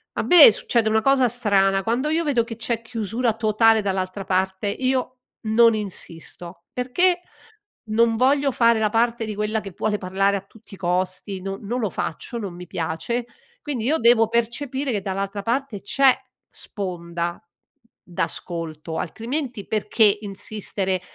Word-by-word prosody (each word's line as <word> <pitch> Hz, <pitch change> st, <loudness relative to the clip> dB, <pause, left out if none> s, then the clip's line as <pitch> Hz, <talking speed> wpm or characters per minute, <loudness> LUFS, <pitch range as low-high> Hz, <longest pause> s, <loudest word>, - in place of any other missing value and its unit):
A -, -, -1 dB
me 330 Hz, -10 st, +9 dB
succede 220 Hz, +1 st, +1 dB
una 220 Hz, 0 st, +2 dB
cosa 270 Hz, -1 st, +4 dB
strana, 195 Hz, -5 st, +2 dB
quando 245 Hz, +7 st, 0 dB
io 325 Hz, +2 st, +1 dB
vedo 270 Hz, -6 st, +2 dB
che 230 Hz, 0 st, -7 dB
c'è 230 Hz, 0 st, -2 dB
chiusura 230 Hz, 0 st, -2 dB
totale 225 Hz, 0 st, +3 dB
dall'altra 190 Hz, 0 st, -2 dB
parte 190 Hz, +2 st, 0 dB
io 255 Hz, +2 st, -1 dB, 0.2 s
non 230 Hz, +1 st, +4 dB
insisto, 175 Hz, -3 st, -7 dB
perché 350 Hz, +9 st, +1 dB, 0.7 s
non 225 Hz, +1 st, +3 dB
voglio 275 Hz, +3 st, +3 dB
fare 230 Hz, -2 st, +3 dB
la 215 Hz, -1 st, +2 dB
parte 230 Hz, +1 st, +1 dB
di 215 Hz, -1 st, -5 dB
quella 210 Hz, +1 st, -1 dB
che 195 Hz, -3 st, -9 dB
vuole 210 Hz, -1 st, -1 dB
parlare 195 Hz, +2 st, 0 dB
a -, -, -6 dB
tutti 205 Hz, -1 st, -15 dB
i -, -, -17 dB
costi, 185 Hz, +1 st, -2 dB
no 195 Hz, +1 st, -4 dB
non 235 Hz, +5 st, -3 dB
lo 215 Hz, -4 st, -1 dB
faccio, 180 Hz, +7 st, -4 dB
non 200 Hz, -6 st, -5 dB
mi 180 Hz, 0 st, -10 dB
piace, 175 Hz, +10 st, -3 dB, 0.4 s
quindi 255 Hz, -7 st, -3 dB
io 310 Hz, +4 st, +2 dB
devo 230 Hz, -1 st, +5 dB
percepire 250 Hz, +4 st, -1 dB
che 205 Hz, -4 st, -1 dB
dall'altra 195 Hz, +1 st, -3 dB
parte 235 Hz, -1 st, -2 dB
c'è 265 Hz, +5 st, +4 dB, 0.3 s
sponda 170 Hz, -4 st, -5 dB, 0.6 s
d'ascolto, 165 Hz, -2 st, -4 dB
altrimenti 235 Hz, -, -4 dB
perché 215 Hz, -1 st, +2 dB
insistere? 195 Hz, -2 st, -3 dB
220 Hz, 150 wpm, -23 LUFS, 195-240 Hz, 0.7 s, me